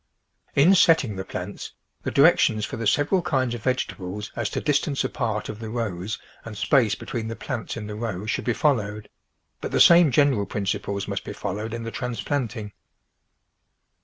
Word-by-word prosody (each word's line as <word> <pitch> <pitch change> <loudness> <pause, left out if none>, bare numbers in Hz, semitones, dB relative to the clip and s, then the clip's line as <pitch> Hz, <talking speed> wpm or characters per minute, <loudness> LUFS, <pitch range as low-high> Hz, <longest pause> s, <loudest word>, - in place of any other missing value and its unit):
In 160 +8 +6
setting 160 - +4
the 95 - -4
plants, - - -6 0.3
the - - -3
directions 140 -8 +4
for - - -6
the 115 -1 -2
sev 145 +8 +2
eral 190 -3 +2
kinds 130 -7 0
of 120 - -5
vegetables 105 -5 -3
as 115 -3 -1
to - - -2
distance 145 -1 0
apart 110 -4 -2
of 105 - -7
the 110 -1 -6
rows 110 -3 -3 0.3
and 110 -3 -8
space 115 -4 +3
between 115 0 -5
the 115 - -4
plants 125 -3 -5
in 110 - -5
the 105 - -6
row 105 -3 -4
should 110 - -2
be 120 - +2
followed, 105 -5 0 0.5
but - - -3
the - - +1
same 170 -2 +8
general 130 -6 +3
principles 100 -1 -2
must - - -3
be - - -6
followed 105 +3 -4
in 115 0 -4
the 115 - -5
transplanting. 120 -3 -3
115 Hz, 180 wpm, -24 LUFS, 105-135 Hz, 0.5 s, same